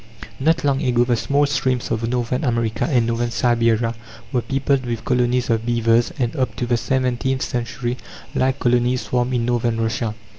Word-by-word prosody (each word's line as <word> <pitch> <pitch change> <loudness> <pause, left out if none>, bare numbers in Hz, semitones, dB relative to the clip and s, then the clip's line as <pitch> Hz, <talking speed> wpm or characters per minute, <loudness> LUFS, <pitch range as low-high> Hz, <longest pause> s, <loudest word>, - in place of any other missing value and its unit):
Not 160 +4 +2
long 140 -1 +1
ago 120 -1 +3
the 120 -1 +1
small 140 +5 +1
streams 130 -3 -1
of 115 +1 -1
Northern 125 +3 -1
America 115 -4 0
and 125 -6 +3
Northern 120 +1 -1
Siberia 115 -1 +2 0.4
were 125 -3 +1
peopled 135 +1 0
with 120 -2 -4
colonies 125 0 +1
of 115 -1 +1
beavers, 115 0 +2
and 120 -3 -1
up 130 -1 -1
to 125 - -2
the 120 0 +1
seventeenth 130 +1 0
century 120 0 -3 0.4
like 130 +1 +1
colonies 125 0 +2
swarmed 125 0 -1
in 120 -1 0
Northern 120 -1 0
Russia. 110 -1 -1
120 Hz, 175 wpm, -21 LUFS, 115-130 Hz, 0.4 s, ago